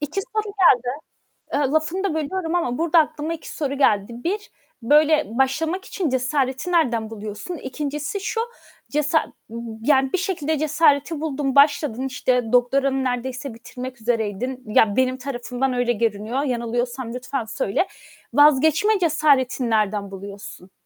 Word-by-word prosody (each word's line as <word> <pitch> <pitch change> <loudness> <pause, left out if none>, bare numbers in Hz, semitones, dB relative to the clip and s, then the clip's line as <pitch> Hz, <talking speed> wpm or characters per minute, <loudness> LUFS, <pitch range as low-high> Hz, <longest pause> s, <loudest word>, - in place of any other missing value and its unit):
2 300 +6 -2
soru 430 - +1 1.1
geldi. 285 - +1
Iıı, 265 - 0
lafını 320 +5 0
da 370 -6 0
bölüyorum 325 +2 -2
ama 250 -8 0
burada 335 0 +3
aklıma 310 +1 0
2 320 - -9
soru 280 -3 -2
geldi. 210 -3 +2
1 410 +4 -2 0.3
böyle 300 +4 +4
başlamak 320 +8 0
için 355 -7 -2
cesareti 260 +4 -1
nereden 240 -10 +1
buluyorsun? 215 - -6
2'ncisi 295 +7 -4
şu, 450 +3 -2 0.5
cesa 300 +2 +1 0.5
yani 265 0 +3
bir - - +2
şekilde 320 -5 -1
cesareti 305 0 +2
buldun, 285 -3 -2
başladın, 280 -3 +3
işte 250 -2 0
doktoranı 265 +2 +2
neredeyse 255 +1 -3
bitirmek 250 +2 -8
üzereydin. 230 +2 -2
Ya 210 -1 +3
benim 255 0 +2
tarafımdan 255 0 -3
öyle 245 -1 +1
görünüyor. 225 +3 -1
Yanılıyorsam 240 -1 -2
lütfen 255 0 -3
söyle. 220 - -1 0.5
Vazgeçme 305 +8 +5
cesaretini 280 -7 +2
nereden 210 -2 0
buluyorsun? 195 -1 -9
270 Hz, 130 wpm, -22 LUFS, 240-310 Hz, 1.1 s, Vazgeçme